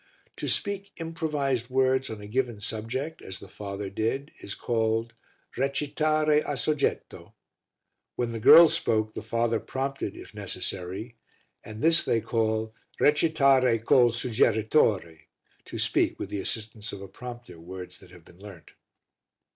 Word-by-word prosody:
To - - -4
speak 200 -1 -2
improvised 150 -7 -2
words 130 0 +2
on 110 -2 -7
a 105 - -9
given 120 -1 -1
subject, 115 +9 -4
as 95 - -8
the 100 - -11
father 100 +1 -6
did, 115 +8 -2
is 100 - -6
called 115 -1 0 0.4
"recitare 150 +3 +1
a 145 - -3
soggetto." 140 +4 -2 0.8
When 120 -1 -1
the 115 - -4
girls 165 +9 +9
spoke, 110 -1 0
the - - -5
father 115 0 0
prompted, 135 -5 -4
if - - -11
necessary, 100 +2 -5 0.5
and 110 +1 -8
this 165 +1 +5
they 115 - +1
call 110 -1 -1 0.3
"recitare 140 -5 +4
col 125 -2 +6
suggeritore" 110 - +2 0.5
to - - -7
speak, - - +1
with - - -5
the 100 - -2
assistance 110 +2 -5
of 100 - -8
a - - -8
prompter, 120 -3 -10
words 90 +1 -9
that - - -17
have 90 -2 -16
been 85 - -18
learnt. 100 -5 -12
115 Hz, 140 wpm, -27 LUFS, 105-135 Hz, 0.8 s, girls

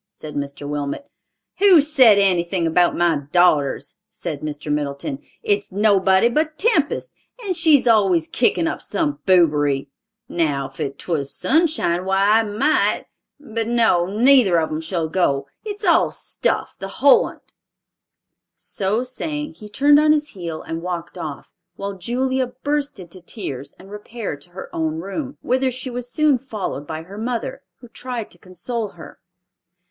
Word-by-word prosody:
said 155 -1 -10
Mr. 140 0 -5
Wilmot. 145 - -4 0.5
"Who's 340 -7 +6
said 245 -8 +7
anything 180 -2 +2
about 175 +2 +2
my 170 -3 +2
daughters?" 155 -6 +2
said - - -6
Mr. 150 0 -5
Middleton. 140 -2 -3 0.2
"It's 205 -1 0
nobody 195 0 +3
but 305 +5 -1
Tempest, 395 - +1 0.3
and 370 -2 -1
she's 315 -5 +4
always 195 -8 +3
kickin' 255 +7 +1
up 320 - -3
some 305 -3 -2
boobery. 145 -6 +3 0.4
Now 140 -5 -1
if 140 0 -4
'twas 145 -6 -2
Sunshine, 270 - +1
why, 195 +3 +3
I - - +3
might—but 225 0 -1
no, 225 -7 +3
neither 225 -2 +5
of 160 - -2
'em 155 +1 -3
shall 165 0 -2
go. 140 -5 0 0.2
It's 415 -1 -5
all 340 -2 +4
stuff, - - -2
the 195 - -5
whole 270 +8 +4
on't." - - -12 1.0
So 205 +5 -1
saying, 295 +4 -5
he 210 - -12
turned 290 +7 +5
on 305 0 +5
his 300 -1 -1
heel 170 -5 -6
and 165 0 -5
walked 175 -1 -5
off, 155 -5 -7 0.2
while 200 0 -5
Julia 255 +6 -1
burst 285 +1 -3
into 180 0 -11
tears 140 - -6
and 195 +2 -15
repaired 210 -7 -6
to 175 - -14
her 180 +2 -9
own 160 -1 -1
room, 230 - -5
whither 260 +1 +1
she 255 +1 -5
was 245 0 -5
soon 295 -1 +2
followed 210 - -5
by 160 0 -5
her 195 +5 -10
mother, 235 0 -3 0.2
who 245 - -12
tried 240 -1 -6
to 175 - -17
console 210 +6 -5
her. 170 - -13
200 Hz, 150 wpm, -21 LUFS, 165-260 Hz, 1.0 s, said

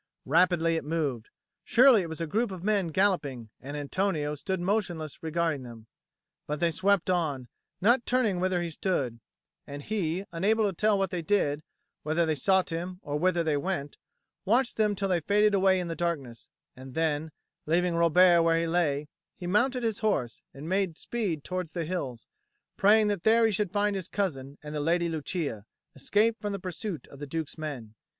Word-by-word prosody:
Rapidly 165 +1 +3
it - - -3
moved: 145 -7 -2 0.3
surely 250 -3 +6
it 170 - -5
was 160 - -6
a 165 - -1
group 220 +9 0
of 185 -3 -8
men 205 -3 +1
galloping, 150 - 0
and 145 +3 -7
Antonio 150 0 -1
stood 190 +5 -3
motionless 175 -5 -2
regarding 160 -2 -1
them. 115 -3 -11 0.6
But 150 0 -3
they 170 -1 +2
swept 190 +2 +2
on, 145 -8 -1 0.3
not 235 +5 +3
turning 230 -7 +1
whither 180 -1 0
he 170 - -4
stood; 140 - -2 0.5
and 145 0 -7
he, 190 -2 -2
unable 210 +6 +2
to 200 - 0
tell 210 +3 +2
what 195 -2 0
they 180 - -2
did, 155 -5 +1 0.4
whether 160 +3 +1
they 160 - +1
sought 185 +6 +2
him 175 +2 -4
or 145 +1 -3
whither 175 0 +2
they 155 -3 +1
went, 145 -3 -3 0.4
watched 235 +5 +2
them 210 -2 +2
till 195 0 -1
they 180 -2 +2
faded 205 +5 +3
away 190 -1 +4
in 180 - -3
the 165 - -4
darkness; 145 -10 -3 0.3
and 130 0 -11
then, 160 -1 0 0.4
leaving 175 +2 +2
Robert 170 +1 +5
where 165 0 +3
he 165 - 0
lay, 155 -4 0 0.3
he 180 - -7
mounted 245 +7 +1
his 225 -2 -1
horse 125 - -1
and 140 +3 -9
made 190 -3 0
speed 195 -11 -3
towards 180 -3 -4
the 170 -2 -2
hills, 140 -9 -4 0.5
praying 215 +2 +5
that 205 -4 0
there 225 +3 +4
he 225 - +3
should 205 -1 -1
find 205 0 +1
his 185 -2 -4
cousin 145 -8 -3
and 150 0 -7
the 150 - -2
Lady 170 +3 +1
Lucia, 155 - -4 0.3
escaped 215 - +1
from 205 -1 -3
the 200 - -4
pursuit 185 0 -5
of 140 - -13
the 145 - -6
Duke's 160 +1 -4
men. 140 -9 -6
170 Hz, 185 wpm, -28 LUFS, 150-195 Hz, 0.6 s, surely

